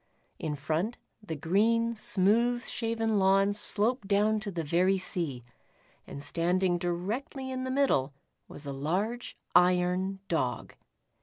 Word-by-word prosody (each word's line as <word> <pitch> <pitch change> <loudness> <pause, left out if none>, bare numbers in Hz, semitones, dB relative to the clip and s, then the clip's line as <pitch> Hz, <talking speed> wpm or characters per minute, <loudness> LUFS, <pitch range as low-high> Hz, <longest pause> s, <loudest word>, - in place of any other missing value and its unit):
In 150 -2 -2
front, 160 - -2 0.2
the 200 -7 -5
green, 220 +9 +2
smooth 230 +3 +2
shaven 225 -2 -1
lawn 195 +1 +4
sloped 210 +2 0
down 210 +2 +3
to 210 -1 -5
the 170 -4 -3
very 180 +5 +2
sea, 165 -9 -4 0.6
and 140 - -7
standing 175 +2 +1
directly 215 +10 -3
in 260 0 -3
the - - -3
middle 260 - +2 0.4
was 145 - -9
a 140 - -4
large 190 - -2 0.2
iron 180 +2 +3
Dog. 125 -8 -1
195 Hz, 130 wpm, -29 LUFS, 170-225 Hz, 0.6 s, lawn